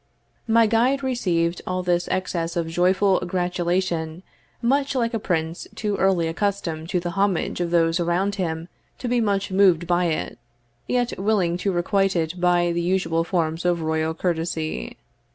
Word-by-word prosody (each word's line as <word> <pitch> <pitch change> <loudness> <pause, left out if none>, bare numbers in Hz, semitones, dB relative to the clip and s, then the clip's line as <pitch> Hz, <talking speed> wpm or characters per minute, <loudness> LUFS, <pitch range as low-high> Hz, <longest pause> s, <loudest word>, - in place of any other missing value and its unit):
My 230 0 +5
guide 245 +5 +2
received 180 -10 0
all 185 0 -1
this 175 -1 +1
excess 170 -2 -2
of 170 -2 -1
joyful 185 +3 +2
gratulation 175 -2 -1 0.4
much 275 +3 +1
like 235 -2 0
a 225 - 0
prince 165 -3 -2
too 210 -2 -1
early 185 -4 +2
accustomed 165 -3 -2
to 180 - +1
the 175 0 -4
homage 195 -2 0
of 175 - -1
those 165 0 +2
around 175 +4 +1
him 165 -4 -3 0.3
to 250 - -5
be 245 0 +2
much 200 -2 0
moved 185 -3 +4
by 175 +1 +2
it, 160 -7 -2 0.5
yet 245 -3 0
willing 195 -4 +1
to 195 +2 -1
requite 195 +2 +1
it 170 +1 -2
by 175 -1 +3
the 170 0 -1
usual 170 -2 +1
forms 165 -2 -1
of 175 -2 +1
royal 160 0 -1
courtesy. 160 - -2
180 Hz, 160 wpm, -23 LUFS, 170-200 Hz, 0.5 s, My